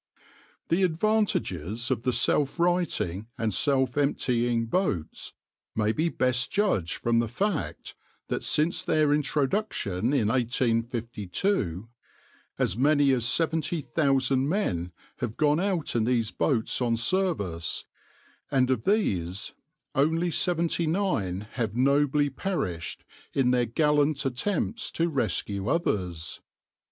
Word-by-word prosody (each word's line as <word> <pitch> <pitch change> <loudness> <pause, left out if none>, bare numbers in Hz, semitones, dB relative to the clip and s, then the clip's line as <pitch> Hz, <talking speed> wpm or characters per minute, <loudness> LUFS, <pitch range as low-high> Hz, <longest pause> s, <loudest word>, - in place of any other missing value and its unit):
\par - - -38 0.6
The - - 0
advantages 160 - 0
of 125 - 0
the 125 - 0
self 140 +4 +2
righting 170 - 0
and 110 -4 -1
self 130 +4 +2
emptying 120 -4 +1
boats 115 - -2 0.4
may 110 0 +1
be 160 +8 0
best 125 -4 +1
judged 195 - +1
from 115 0 +1
the 115 - 0
fact, 175 - -3 0.3
that - - -3
since 155 +3 +3
their 150 -2 +2
introduction 145 - 0
in 120 -7 +2
1852, 115 - -1 0.7
as - - 0
many 145 +2 +3
as 120 -3 +1
seventy 160 +3 0
thousand 135 -2 +1
men 90 - -1 0.3
have 120 -3 -4
gone 150 0 +3
out 185 -7 -1
in 115 -2 +2
these 115 -3 +1
boats 90 +8 0
on 120 -2 +2
service, 110 - 0 0.6
and 130 -1 +2
of 120 -4 -1
these 100 - 0 0.4
only 165 +5 +1
seventy 170 0 +1
nine 155 - -1
have 115 -4 -3
nobly 140 +2 +2
perished 110 - -3 0.3
in 130 -2 +3
their 125 -1 +2
gallant 150 +2 +2
attempts 205 - -1
to 170 +1 0
rescue 100 - -1
others. 90 - -2
130 Hz, 120 wpm, -27 LUFS, 110-160 Hz, 0.7 s, since